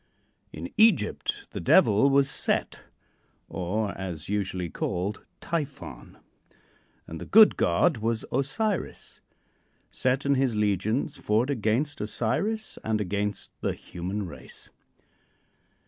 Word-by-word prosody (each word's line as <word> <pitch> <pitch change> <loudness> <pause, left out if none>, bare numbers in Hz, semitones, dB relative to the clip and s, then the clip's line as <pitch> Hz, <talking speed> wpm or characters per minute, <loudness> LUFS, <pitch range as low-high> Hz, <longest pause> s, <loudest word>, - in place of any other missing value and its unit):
In 85 +3 -7
Egypt 200 - +2
the - - -5
devil 105 +7 +5
was 140 0 +4
Set - - -1 0.6
or, 100 +3 -2
as 90 -5 -6
usually 95 -3 -1
called, 90 +5 -3 0.2
Typhon 165 -5 -5 0.9
and 80 0 -8
the - - -7
good 220 0 +7
god 170 -7 +2
was 115 +1 -1
Osiris. 140 - -2 0.7
Set 130 +2 0
and 140 -1 +3
his 130 -4 +1
legions 105 - 0
fought 115 +6 +1
against 130 +5 0
Osiris 155 - -1
and 110 -1 0
against 100 0 -2
the - - 0
human 95 +4 -5
race. 85 - -10
110 Hz, 110 wpm, -27 LUFS, 100-140 Hz, 0.9 s, good